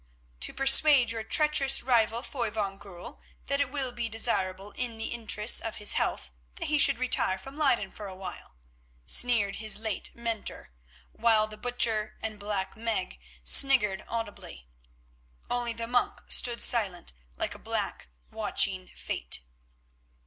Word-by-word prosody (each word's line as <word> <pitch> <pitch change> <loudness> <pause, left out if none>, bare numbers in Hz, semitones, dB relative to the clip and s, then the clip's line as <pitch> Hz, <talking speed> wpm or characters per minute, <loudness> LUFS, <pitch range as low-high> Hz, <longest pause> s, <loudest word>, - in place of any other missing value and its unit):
"To - - 0
persuade 270 -2 +4
your 225 -1 -4
treacherous 290 +3 +3
rival, 235 -1 +1
Foy 240 -6 -3
van 200 -2 -4
Goorl, 185 -4 -12 0.2
that 280 0 0
it 280 - -1
will 270 -2 -1
be 240 -1 -5
desirable 200 -3 0
in 240 -1 -4
the 225 - -4
interests 220 -1 +1
of 225 -1 -5
his 210 -1 -3
health - - -2 0.2
that 335 -3 -2
he 300 -1 +1
should - - +6
retire 245 -6 +1
from 270 +9 -11
Leyden 265 -10 +1
for 210 - -9
a 190 - -9
while," 185 - -9 0.5
sneered 225 - +4
his 215 -1 0
late 220 -2 -3
mentor, 230 - -4 0.4
while 220 -1 +3
the 215 0 -10
Butcher 220 -2 -1
and 215 -2 -4
Black 205 -1 -3
Meg 220 - -3 0.2
sniggered 210 - +4
audibly. 205 - -7 0.8
Only 245 -1 -1
the 230 0 -5
monk 245 +1 -1
stood 240 -1 +4
silent, 195 - +2 0.2
like - - -2
a - - -13
black - - -4 0.2
watching - - 0
fate. - - -4
225 Hz, 150 wpm, -28 LUFS, 205-245 Hz, 0.8 s, should